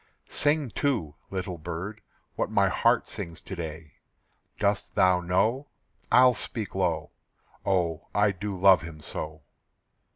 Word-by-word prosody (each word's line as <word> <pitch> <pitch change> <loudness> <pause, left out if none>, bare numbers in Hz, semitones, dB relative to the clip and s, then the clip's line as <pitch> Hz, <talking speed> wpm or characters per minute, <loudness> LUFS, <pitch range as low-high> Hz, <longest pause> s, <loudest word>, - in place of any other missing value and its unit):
Sing 145 -4 +1
too, 110 - 0 0.2
little 95 -2 -4
bird, 90 +7 -5 0.3
what - - -1
my - - +3
heart - - +2
sings 85 -1 -6
to 95 - -7
day. 80 -3 -7 0.6
Dost - - 0
thou 90 -1 +5
know? 110 +10 +1 0.4
I'll 125 0 +7
speak 110 -3 -4
low 85 -5 0 0.6
"Oh, 85 -4 0
I 105 0 +3
do 100 0 -5
love 95 0 +7
him 80 -2 -9
so." 75 0 -5
90 Hz, 130 wpm, -27 LUFS, 80-105 Hz, 0.6 s, I'll